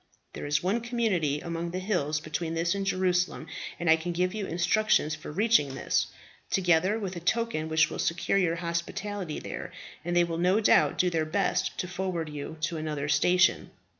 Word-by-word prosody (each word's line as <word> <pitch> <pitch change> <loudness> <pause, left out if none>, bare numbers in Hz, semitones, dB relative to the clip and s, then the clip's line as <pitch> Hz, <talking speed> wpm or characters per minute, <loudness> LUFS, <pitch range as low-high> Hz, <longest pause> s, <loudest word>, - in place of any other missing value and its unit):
There - - -6
is 150 +1 +1
one 200 +6 +1
community 210 - 0
among 170 0 -4
the 180 - -4
hills 175 -6 0
between 160 +1 -3
this 170 +1 +1
and 195 -1 -3
Jerusalem, 180 -3 +1 0.3
and 175 - -3
I 160 0 +6
can 175 +2 -4
give 180 +1 0
you 210 -3 -3
instructions 175 -1 +2
for 155 -1 -7
reaching 175 - +2
this, - - 0 0.4
together 180 +2 +2
with 195 -4 -4
a - - -4
token 175 -3 -1
which 160 0 +3
will - - -5
secure 170 +3 +1
you 170 -3 +1
hospitality 170 +1 -3
there, - - -6 0.3
and 175 +1 -2
they 175 - +5
will 165 -1 -3
no 185 +4 +3
doubt 215 - +4
do 180 -1 +2
their 160 -2 0
best 195 +6 0
to 180 - -2
forward 180 -3 -3
you 150 +2 -6
to 165 +1 -1
another 150 -2 -3
station. 175 +5 +3
175 Hz, 190 wpm, -28 LUFS, 160-190 Hz, 0.4 s, I